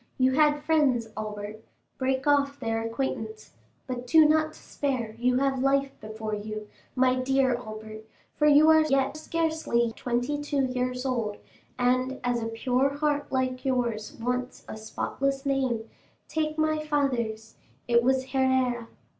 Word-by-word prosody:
You 260 0 +3
had 295 +1 +3
friends, 280 -8 +2
Albert; 215 0 -6 0.4
break 260 0 0
off 285 -1 +2
their 225 0 -1
acquaintance. 225 -2 -4 0.3
But 250 -1 -5
do 315 +3 +7
not 310 0 +2
despair; 250 -6 -3
you 250 +1 +2
have 270 -1 +1
life 275 0 +2
before 215 0 -5
you, 210 0 -5 0.3
my 255 0 +3
dear 265 0 +2
Albert, 220 -2 -7 0.3
for 300 - +3
you 300 +2 +7
are 315 0 +6
yet 275 -2 +1
scarcely 315 -7 0
twenty 245 +4 -1
two 290 -2 0
years 250 0 -2
old; 230 -5 -1 0.4
and 255 +1 +1
as 245 -1 0
a 225 - -2
pure 250 +4 +1
heart 290 0 -1
like 255 -1 -1
yours 240 -5 -1
wants 250 +2 -3
a - - -6
spotless 270 +5 -3
name, 260 -5 0 0.4
take 310 -1 -2
my 310 0 +1
father's—it 235 -4 -1
was 260 +1 +1
Herrera. 260 -3 +1
255 Hz, 140 wpm, -27 LUFS, 230-280 Hz, 0.4 s, do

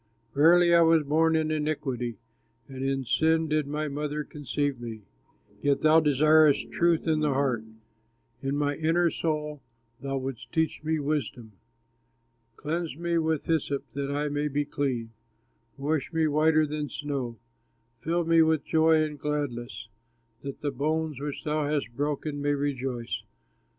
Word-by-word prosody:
Verily 170 +4 +5
I 170 - +7
was 165 -1 +5
born 160 +3 +2
in 155 -1 +1
iniquity, 135 -7 -2 0.5
And 135 -1 -6
in 135 0 0
sin 160 +6 +2
did 155 -1 0
my 150 +1 -2
mother 150 +1 -3
conceive 145 -2 -3
me. 110 -3 -7 0.6
Yet 140 +1 +1
thou 155 +1 +6
desirest 155 0 +4
truth 170 -1 +2
in 155 -1 +2
the 150 -3 +1
heart, 130 -5 0 0.8
In 135 +1 -1
my 145 0 0
inner 165 +2 +2
soul 150 -2 -2 0.4
thou 135 0 -2
wouldst 130 -3 -6
teach 160 -1 -1
me 160 +1 0
wisdom. 140 -6 -3 1.0
Cleanse 160 -1 -3
me 170 0 0
with 160 -2 0
hyssop 145 -4 0
that 140 0 -3
I 145 +1 -1
may 145 +1 -1
be 145 0 -1
clean, 125 -6 -2 0.7
Wash 145 +1 -1
me 160 -1 +1
whiter 155 +1 +3
than 150 -1 -4
snow. 135 -5 -4 0.6
Fill 170 +1 -1
me 165 0 +5
with 160 -2 +2
joy 160 -1 +4
and 150 -2 -5
gladness, 135 -6 -3 0.5
That 140 -1 -7
the 145 - -1
bones 155 +1 -1
which 145 0 -5
thou 150 -1 0
hast 140 -6 -2
broken 145 +1 -2
may 145 0 +1
rejoice. 130 -4 -2
150 Hz, 150 wpm, -27 LUFS, 140-155 Hz, 1.0 s, I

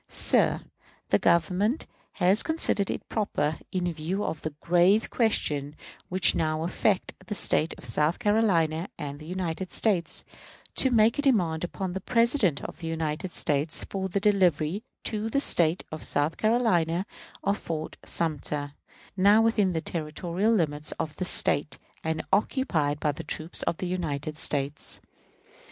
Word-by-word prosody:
Sir: - - +3 0.5
The - - +3
Governor 185 - +2 0.4
has 190 +3 +4
considered 315 -11 0
it - - -4
proper, 160 -8 -1
in 180 -2 -1
view 170 +6 -3
of 160 - -3
the 155 - -3
grave 180 +5 +3
questions 150 - 0 0.3
which 185 0 +4
now 155 0 -1
affect 185 +3 0
the 210 - -3
State 160 -4 +1
of - - -11
South 150 +7 +1
Carolina 195 -7 +1
and 145 -1 -6
the 155 - -11
United 180 0 -4
States, 180 -7 +1 0.5
to 265 - +4
make 230 +2 +3
a - - +3
demand 180 - +1
upon 180 +1 -4
the 190 - -4
President 230 - +2
of 155 - -8
the 165 - -6
United 160 +2 -3
States 150 +1 -1
for 190 -1 -2
the 200 - 0
delivery 190 -3 +2 0.2
to 215 0 -1
the 275 - +1
State 170 - +3
of 155 - -6
South 145 +3 +1
Carolina 190 -7 +1 0.4
of 200 +1 0
Fort 155 -2 -5
Sumter, 150 -3 -2 0.4
now 200 +3 +5
within 210 -5 +2
the 160 - -1
territorial 170 +6 -2
limits 150 -7 +1
of 155 -1 -5
this 185 - 0
Sate 145 -1 +2 0.3
and 160 0 -2
occupied 170 - +1
by 150 - +1
troops 155 +3 -4
of 165 - -1
the - - -4
United 155 -4 -3
States. 140 0 +1
175 Hz, 150 wpm, -27 LUFS, 155-205 Hz, 0.5 s, now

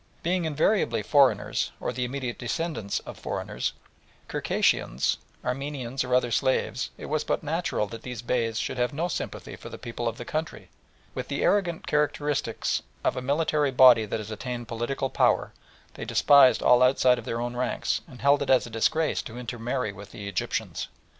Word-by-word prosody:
Being 175 0 +1
invariably 160 +7 +1
foreigners, 140 -3 +3
or - - -3
the 125 +1 -1
immediate 125 -1 -4
descendants 120 -4 -2
of - - -10
foreigners, - - -3 0.6
Circassians, 65 +4 +1 0.3
Armenians, 135 0 -2
or 125 0 +1
other 125 -1 +2
slaves, 130 -1 0
it - - -8
was 155 0 -1
but - - -1
natural 160 -7 -1
that 115 +2 -9
these 125 -2 -6
Beys 115 -2 0
should 125 - -2
have 125 +3 +1
no 165 +4 -1
sympathy - - -5
for - - -10
the - - -8
people 120 -1 -4
of 115 0 -2
the 120 - -7
country, 155 +5 -3
and, - - -22 0.4
with - - -4
the - - -2
arrogance 180 -5 +1
characteristic 145 -4 -1 0.4
of - - +1
a 125 - -3
military 145 +2 +1
body 125 -4 +7
that 105 - -2
has 110 0 -7
attained 120 +2 -5
political 120 +4 -2
power, - - +2 0.4
despised 140 -3 +5
all 125 0 +6
outside 125 -1 +4
of 115 - -10
their 115 - -2
own 120 0 -3
ranks, 125 0 -1
and 125 - -13
held 140 +1 +5
it 140 - -2
a 130 -2 +4
disgrace 155 +8 +1
to 115 - -9
intermarry 120 -1 -3
with 100 +1 -11
the 100 0 -8
Egyptians. 100 -3 -3
125 Hz, 175 wpm, -27 LUFS, 115-145 Hz, 0.6 s, body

